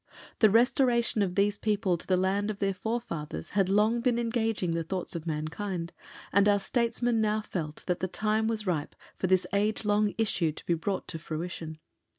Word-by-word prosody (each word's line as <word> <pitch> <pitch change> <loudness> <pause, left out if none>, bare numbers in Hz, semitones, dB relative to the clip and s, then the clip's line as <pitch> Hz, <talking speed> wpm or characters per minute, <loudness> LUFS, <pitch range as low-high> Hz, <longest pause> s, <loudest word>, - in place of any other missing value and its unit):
The 215 - +6
restoration 235 0 +3
of 185 -3 0
these 205 0 +2
people 210 -4 +1
to 170 - -10
the 185 - +3
land 195 +3 +1
of 210 - -3
their 195 -1 0
forefathers 180 - -4
had 195 -1 +2
long 215 +4 +3
been 245 -1 +2
engaging 225 -6 0
the 165 0 -1
thoughts 180 +1 -4
of 170 0 -5
mankind, 165 +3 -3 0.4
and 200 +1 +5
our 205 0 +4
Statesmen 235 +1 0
now 215 0 +1
felt 155 -7 -5
that 180 -2 -1
the 185 - -1
time 215 +3 0
was 220 -2 -2
ripe 165 -6 -2 0.2
for 185 - 0
this 185 0 +3
age 210 +2 +1
long 205 0 +2
issue 180 -8 +1
to - - -11
be 175 - +2
brought 180 +4 -2
to 160 - -4
fruition. 160 0 -5
200 Hz, 190 wpm, -29 LUFS, 175-220 Hz, 0.4 s, The